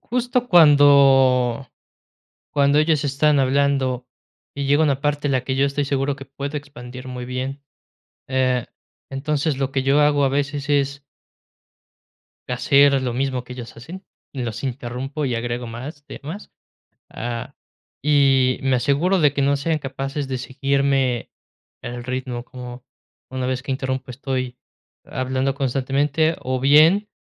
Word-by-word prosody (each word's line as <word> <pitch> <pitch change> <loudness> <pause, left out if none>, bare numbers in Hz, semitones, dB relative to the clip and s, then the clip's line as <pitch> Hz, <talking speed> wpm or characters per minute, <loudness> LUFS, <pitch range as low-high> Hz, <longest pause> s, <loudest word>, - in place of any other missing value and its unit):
Justo 245 +1 -1
cuando 135 - +5 0.8
cuando 140 0 +3
ellos 155 -1 +2
están 145 +1 +2
hablando, 130 -2 +1 0.5
y 140 -1 -3
llega 145 +3 +3
una 140 -3 +1
parte, 145 0 -1
la 130 -2 +1
que 130 - -2
yo 135 +1 +2
estoy 140 +1 -1
seguro 140 0 -1
que 135 - -10
puedo 140 +2 -6
expandir 130 -3 -9
muy 125 -1 -6
bien, 130 +3 -5 0.7
eh, 130 -2 +1 0.4
entonces 145 +1 -1
lo 135 -1 -1
que 135 - 0
yo 135 +2 +3
hago 145 -1 +3
a 135 - +3
veces 145 +1 -2
es 140 -1 0 1.4
hacer 140 +3 +4
a - - +3
lo 125 -2 -2
mismo 130 -1 -2
que 125 - -9
ellas 125 -2 -9
hacen, 170 +11 -10 0.3
los 120 -2 -4
interrumpo 130 +3 -4
y 125 -3 -1
agrego 120 +1 -3
más 135 +6 -8
temas. 160 +7 -9 0.6
Ah, 115 0 -6 0.5
y 135 -3 +3
me 135 -1 +2
aseguro 145 +10 +1
de 145 -3 +3
que 145 - -1
no 140 +1 +2
sean 155 +2 -1
capaces 135 +1 -4
de 130 -1 -3
seguirme 135 -1 0 0.5
el 120 0 -6
ritmo. 125 -1 -4
Como 125 -1 -10 0.5
una 130 -1 -3
vez 130 0 -2
que 140 - -4
interrumpo 130 -1 -3
estoy 130 -1 -4 0.5
hablando 130 +1 -2
constantemente, 140 +4 0
o 130 0 -2
bien, 155 +10 +5
135 Hz, 145 wpm, -21 LUFS, 130-145 Hz, 1.4 s, cuando